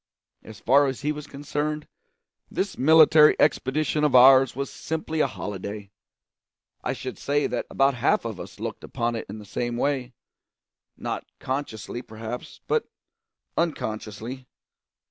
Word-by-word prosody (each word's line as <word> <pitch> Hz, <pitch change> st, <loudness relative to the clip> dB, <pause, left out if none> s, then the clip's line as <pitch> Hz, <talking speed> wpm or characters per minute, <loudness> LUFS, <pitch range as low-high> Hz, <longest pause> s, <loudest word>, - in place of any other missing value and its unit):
As 110 Hz, -, -12 dB
far 140 Hz, +3 st, +4 dB
as 135 Hz, -1 st, -3 dB
he 150 Hz, +1 st, 0 dB
was 150 Hz, -1 st, -6 dB
concerned, 150 Hz, +2 st, -3 dB, 0.6 s
this 195 Hz, 0 st, -2 dB
military 155 Hz, +1 st, +7 dB
expedition 150 Hz, +1 st, +1 dB
of 150 Hz, -3 st, +3 dB
ours 130 Hz, 0 st, +7 dB
was 140 Hz, +1 st, -3 dB
simply 160 Hz, 0 st, -4 dB
a 145 Hz, -, +4 dB
holiday. 100 Hz, -3 st, -6 dB, 0.9 s
I -, -, -1 dB
should 130 Hz, 0 st, -7 dB
say 145 Hz, +1 st, +1 dB
that -, -, -2 dB
about 135 Hz, 0 st, +3 dB
half 120 Hz, -, +1 dB
of -, -, -5 dB
us -, -, -9 dB
looked -, -, -5 dB
upon 120 Hz, 0 st, -2 dB
it 115 Hz, -, -5 dB
in 105 Hz, -, -6 dB
the 105 Hz, -, -10 dB
same 120 Hz, +4 st, -3 dB
way; 130 Hz, -2 st, -1 dB, 0.8 s
not -, -, -4 dB
consciously, 125 Hz, -4 st, -4 dB
perhaps, 110 Hz, +1 st, -8 dB
but -, -, 0 dB, 0.7 s
unconsciously. 120 Hz, -5 st, -3 dB
130 Hz, 140 wpm, -25 LUFS, 115-150 Hz, 0.9 s, military